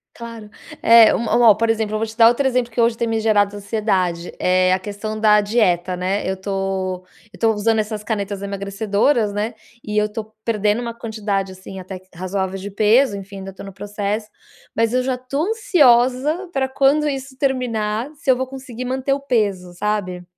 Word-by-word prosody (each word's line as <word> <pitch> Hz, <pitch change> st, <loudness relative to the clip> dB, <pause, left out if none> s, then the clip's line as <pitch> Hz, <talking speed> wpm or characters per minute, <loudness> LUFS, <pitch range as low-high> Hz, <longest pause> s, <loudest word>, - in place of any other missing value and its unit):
Claro. 230 Hz, -2 st, -9 dB, 0.3 s
É 230 Hz, -1 st, +7 dB
uma 235 Hz, 0 st, +4 dB
um -, -, +3 dB
por 230 Hz, +2 st, 0 dB
exemplo, 215 Hz, -1 st, -2 dB
eu -, -, +1 dB
vou 220 Hz, -, -1 dB
te 220 Hz, -, -10 dB
dar 230 Hz, -1 st, +7 dB
outro 240 Hz, +4 st, +2 dB
exemplo, 250 Hz, -2 st, 0 dB
que 230 Hz, -, -5 dB
hoje 230 Hz, 0 st, +3 dB
tem 235 Hz, +1 st, -2 dB
me 225 Hz, 0 st, 0 dB
gerado 205 Hz, -2 st, +2 dB
ansiedade. 195 Hz, -5 st, -1 dB
É 185 Hz, 0 st, +3 dB
a -, -, +3 dB
questão 210 Hz, +2 st, -5 dB
da 210 Hz, -1 st, +5 dB
dieta, 190 Hz, -5 st, +1 dB
né? 185 Hz, +2 st, -2 dB
Eu 190 Hz, -, -2 dB
tô 190 Hz, -1 st, -3 dB, 0.3 s
eu -, -, -14 dB
tô 225 Hz, -1 st, +3 dB
usando 220 Hz, +1 st, +1 dB
essas 210 Hz, 0 st, -3 dB
canetas 200 Hz, -2 st, -3 dB
emagrecedoras, 200 Hz, +3 st, 0 dB
né? 215 Hz, +3 st, -2 dB, 0.3 s
E 210 Hz, 0 st, -4 dB
eu 210 Hz, 0 st, +3 dB
tô 215 Hz, 0 st, -5 dB, 0.2 s
perdendo 210 Hz, 0 st, +1 dB
uma 235 Hz, -1 st, -4 dB
quantidade, 210 Hz, -4 st, -3 dB
assim, 190 Hz, +1 st, -10 dB
até 185 Hz, 0 st, -8 dB
razoável 190 Hz, +1 st, -3 dB
de 200 Hz, -, -6 dB
peso 215 Hz, +3 st, +3 dB
enfim, 195 Hz, 0 st, -9 dB
ainda 195 Hz, 0 st, -8 dB
tô -, -, -11 dB
no 195 Hz, -1 st, -9 dB
processo, 205 Hz, +2 st, -3 dB, 0.5 s
mas 230 Hz, +1 st, +1 dB
eu 255 Hz, -, +2 dB
já 255 Hz, 0 st, -1 dB
tô 275 Hz, +4 st, -3 dB
ansiosa 300 Hz, -, +3 dB
pra 265 Hz, -3 st, 0 dB
quando 275 Hz, +3 st, +2 dB
isso 270 Hz, -1 st, -5 dB
terminar, 240 Hz, -3 st, -1 dB
se 280 Hz, -, -6 dB
eu 260 Hz, -, +6 dB
vou 260 Hz, -, -1 dB
conseguir 260 Hz, -2 st, -8 dB
manter 265 Hz, +2 st, -1 dB
o 275 Hz, -, -1 dB
peso, 205 Hz, -9 st, -1 dB
sabe? 185 Hz, -2 st, -2 dB
215 Hz, 195 wpm, -20 LUFS, 200-240 Hz, 0.5 s, É